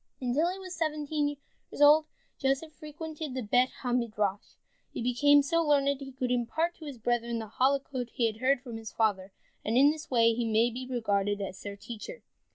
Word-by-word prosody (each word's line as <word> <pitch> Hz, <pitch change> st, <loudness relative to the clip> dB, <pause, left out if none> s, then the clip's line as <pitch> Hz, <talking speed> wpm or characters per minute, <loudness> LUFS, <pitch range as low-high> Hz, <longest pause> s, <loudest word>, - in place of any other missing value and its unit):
Until 275 Hz, +7 st, +1 dB
he 375 Hz, -, -6 dB
was 370 Hz, -2 st, -8 dB
seventeen 300 Hz, -2 st, -1 dB, 0.3 s
years -, -, -10 dB
old, 300 Hz, +2 st, +7 dB, 0.3 s
Joseph 275 Hz, +3 st, 0 dB
frequented 305 Hz, -2 st, -7 dB
the 260 Hz, -, -2 dB
Bet 245 Hz, +4 st, +3 dB
ha 245 Hz, -2 st, -1 dB
Midrash, 210 Hz, -5 st, -1 dB, 0.3 s
and -, -, -42 dB
he -, -, -4 dB
became 285 Hz, +4 st, +5 dB
so 335 Hz, +4 st, +1 dB
learned 290 Hz, -3 st, +3 dB
that 280 Hz, -1 st, -1 dB
he 270 Hz, -1 st, -8 dB
could 255 Hz, -1 st, -3 dB
impart 250 Hz, +8 st, 0 dB
to 320 Hz, -, -10 dB
his 280 Hz, -4 st, -7 dB
brethren 235 Hz, 0 st, -1 dB
the 225 Hz, -, -4 dB
Halakot 265 Hz, -2 st, +1 dB
he 235 Hz, -, 0 dB
had 220 Hz, -1 st, -1 dB
heard 260 Hz, +2 st, +2 dB
from 240 Hz, -4 st, -7 dB
his 225 Hz, -1 st, -8 dB
father, 200 Hz, -4 st, 0 dB, 0.3 s
and 225 Hz, +3 st, 0 dB
in 280 Hz, +3 st, +7 dB
this 310 Hz, 0 st, -8 dB
way 230 Hz, -2 st, +4 dB
he 235 Hz, +1 st, -1 dB
may 230 Hz, +2 st, +3 dB
be 250 Hz, +2 st, -6 dB
regarded 205 Hz, -4 st, 0 dB
as 190 Hz, -1 st, -6 dB
their 200 Hz, 0 st, -6 dB
teacher. 235 Hz, -, -9 dB
255 Hz, 205 wpm, -29 LUFS, 230-295 Hz, 0.3 s, old